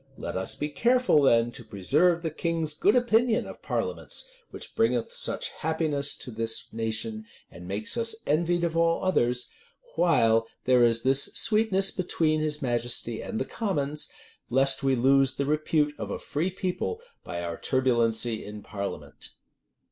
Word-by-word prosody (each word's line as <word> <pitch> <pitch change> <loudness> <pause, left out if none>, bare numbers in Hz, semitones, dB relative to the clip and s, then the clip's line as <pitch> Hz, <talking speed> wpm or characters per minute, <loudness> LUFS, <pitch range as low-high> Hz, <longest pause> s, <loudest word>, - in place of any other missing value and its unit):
Let - - -6
us 95 0 -2
be 150 - -3
careful 240 -2 +3
then 120 -3 +3
to - - -10
preserve 155 - +1
the 160 - -2
king's 165 -1 -2
good 200 +8 +2
opinion 240 -1 +2
of - - -10
parliaments, - - -3 0.2
which - - -8
bringeth 455 +1 0
such - - -1
happiness 155 -3 -1
to 125 - -6
this 115 0 -1
nation, 110 -1 -3 0.3
and 90 0 -11
makes 100 - -1
us 230 -1 0
envied 170 +3 +1
of 165 -1 -1
all 165 +1 +2
others, 125 -9 +1 0.4
while 115 -9 +3 0.2
there 125 -1 +4
is 115 -1 +3
this 135 +1 +5
sweetness 215 -3 +3
between 160 -4 0
his 150 -1 -2
majesty 120 -2 -1
and 220 - -4
the - - -1
commons; 150 -9 -2 0.4
lest 135 +2 +4
we 135 -1 +2
lose 135 +2 +3
the 140 - -1
repute 150 0 +1
of - - -5
a - - -3
free 160 +6 -2
people 190 - -3 0.2
by 85 0 -5
our 85 -1 -4
turbulency 120 -3 +1
in 105 0 -9
parliament." 100 -1 -6
145 Hz, 155 wpm, -27 LUFS, 115-175 Hz, 0.4 s, this